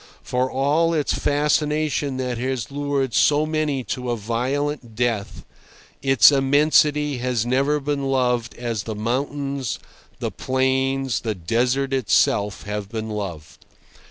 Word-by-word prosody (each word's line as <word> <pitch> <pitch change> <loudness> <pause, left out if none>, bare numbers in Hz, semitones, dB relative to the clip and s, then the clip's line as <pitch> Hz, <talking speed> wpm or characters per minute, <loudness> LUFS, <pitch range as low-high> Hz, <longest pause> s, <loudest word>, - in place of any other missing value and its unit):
For 125 +1 0
all 150 +6 +1
its 150 -2 0
fascination 150 -1 0
that 125 -2 -2
has 130 -1 -3
lured 140 -3 -1
so 150 +1 +4
many 155 -4 -1
to 125 -1 -5
a 120 - 0
violent 125 +3 -2
death, 115 -4 -2 0.6
its 135 -2 +6
immensity 145 0 +3
has 125 -2 -1
never 135 +4 +1
been 140 -1 -2
loved 125 -3 0
as 115 -3 -3
the 110 +1 -5
mountains, 135 +3 -2 0.4
the - - -3
plains, 130 -1 0
the 110 -2 -3
desert 125 +9 0
itself, 105 -4 +1
have 105 -1 -4
been 110 -1 -4
loved. 85 -8 -6
130 Hz, 130 wpm, -22 LUFS, 115-145 Hz, 0.6 s, its